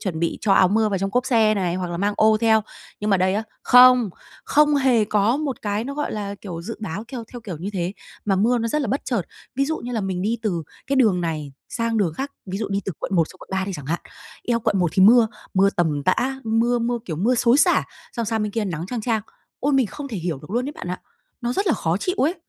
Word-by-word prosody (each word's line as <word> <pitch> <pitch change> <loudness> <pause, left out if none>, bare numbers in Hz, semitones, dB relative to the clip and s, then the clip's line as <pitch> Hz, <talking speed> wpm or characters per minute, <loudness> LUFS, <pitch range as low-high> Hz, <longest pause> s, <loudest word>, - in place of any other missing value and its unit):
chuẩn 175 -5 -3
bị 170 - -1
cho 205 - +2
áo 185 -1 +5
mưa 220 +2 +2
vào 195 -2 -1
trong 195 +1 -2
cốp 250 +4 0
xe 225 -4 +3
này 180 -4 -1
hoặc 180 -1 -3
là 170 - -3
mang 200 +3 0
ô 220 0 +5
theo. 220 -1 +4 0.4
Nhưng 210 0 -1
mà 195 - +5
đây 185 +1 +1
á, 215 - 0 0.2
không, 250 -3 +7 0.3
không 300 0 +4
hề 255 -5 +3
có 210 +3 +2
một 285 -5 -3
cái 210 +2 -1
nó, 280 - -5
gọi 295 +1 -2
là, 205 -1 -4
kiểu, 175 -4 -7
dự 230 +5 -6
báo 210 0 -5
theo 240 -3 -5
theo 245 - -7
kiểu 190 -7 -6
như 190 +5 -4
thế, 180 -1 -2 0.3
mà 195 -2 +2
mưa 235 +6 +3
nó 230 0 -1
rất 300 +5 0
là 255 - -2
bất 270 +7 -1
chợt. 235 -7 0 0.3
Ví 275 +2 +1
dụ 315 +3 -1
như 245 - -6
là 225 - -1
mình 190 -2 -2
đi 225 +4 0
từ 180 -7 -1 0.2
cái 275 - 0
đường 215 -9 +4
này 155 -4 -3 0.2
sang 230 -1 -1
đường 185 -7 +1
khác, 275 - -4
ví 190 +1 -4
dụ 220 - -3
đi 200 0 -1
từ 195 - -3
quận 195 - -3
1 165 -3 +3
xuống 185 - -15
quận - - -13
3 190 0 0
đi 195 - -4
chẳng 145 -5 -8
hạn. 170 +4 -1 0.5
Eo, 235 -1 +2
quận 205 - +1
1 175 -3 +2
thì 190 - +4
mưa, 230 +3 +7 0.3
mưa 195 +1 +4
tầm 155 -5 +1
tã, 265 - 0
mưa 230 +2 +2
mưa, 240 +1 -1
kiểu, 160 - -4
mưa 225 +10 +2
xối 240 +2 +4
xả, - - +4 0.3
xong 235 - -2
sang 220 0 0
bên 210 -1 -3
kia 225 -1 -1
nắng 170 -3 -4
chang 235 +4 -3
chang. 220 -1 0 0.4
Ôi, 285 - +1
mình 265 -3 +3
không 280 +7 -7
thể 230 - -5
hiểu 170 -5 -3
được 150 +5 -13
luôn 240 +4 0
ấy - - -5
bạn 295 - -8
ạ, 180 - -4 0.4
nó 240 0 -1
rất 395 +9 -1
là 340 - +4
khó 165 - 0
chịu 365 - -2
ấy! 315 +7 +2
215 Hz, 280 wpm, -22 LUFS, 185-245 Hz, 0.5 s, không